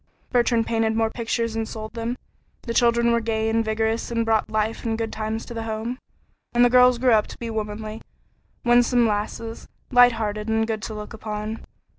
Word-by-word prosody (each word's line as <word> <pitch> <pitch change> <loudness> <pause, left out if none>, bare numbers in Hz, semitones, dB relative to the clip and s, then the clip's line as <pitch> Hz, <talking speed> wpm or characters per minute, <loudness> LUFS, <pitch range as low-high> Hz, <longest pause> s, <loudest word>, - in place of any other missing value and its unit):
Bertrand 235 -2 +2
painted 225 -1 0
more 225 0 +1
pictures 230 -1 -2
and 225 0 -2
sold 220 0 -7
them; 230 +1 -3 0.5
the 230 - -3
children 235 0 +3
were 235 - +3
gay 220 -1 -1
and 225 0 +2
vigorous 220 +1 -1
and 230 -1 0
brought 220 -1 +1
life 215 +1 -1
and 225 -2 -1
good 225 -1 -3
times 220 +1 -3
to - - -8
the 225 - -4
home, 225 +3 -4 0.5
and 240 0 +5
the 245 - +3
girls 250 0 +6
grew 250 +1 +3
up 215 -1 +3
to - - -10
be 230 -1 -5
womanly, 215 0 -4 0.6
winsome 240 0 +4
lasses, 220 +2 -3 0.2
light 245 -1 +7
hearted 215 -1 -3
and 220 0 +2
good 220 -1 -3
to 215 - -5
look 210 +1 -7
upon. 215 0 -5
225 Hz, 195 wpm, -24 LUFS, 220-235 Hz, 0.6 s, light